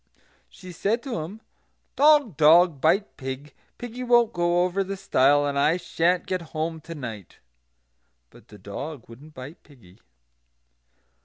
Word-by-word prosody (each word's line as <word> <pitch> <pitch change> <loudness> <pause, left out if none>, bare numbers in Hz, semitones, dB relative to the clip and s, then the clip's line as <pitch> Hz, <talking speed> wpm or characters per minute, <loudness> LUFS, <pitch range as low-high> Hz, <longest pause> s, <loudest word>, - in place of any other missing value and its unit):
She 185 -2 -12
said 210 +7 -1
to 255 - -4
him, 185 +8 -8 0.5
"Dog, 290 - +4
dog, 155 0 +5
bite 195 +7 +1
pig; 135 +2 -7 0.2
piggy 245 +1 -8
won't 240 -2 +3
go 175 0 +1
over 185 +2 -1
the 195 +1 -6
stile; 145 -4 +3
and 140 -1 -1
I 155 +4 +3
sha'n't 175 0 0
get 185 -1 -3 0.2
home 160 0 -3
to 165 +2 -9
night." 115 - -8 0.9
But - - -19
the - - -14
dog 145 -5 -8
wouldn't 140 +7 -15
bite 135 +7 -10
piggy. 110 - -20
165 Hz, 145 wpm, -24 LUFS, 140-195 Hz, 0.9 s, dog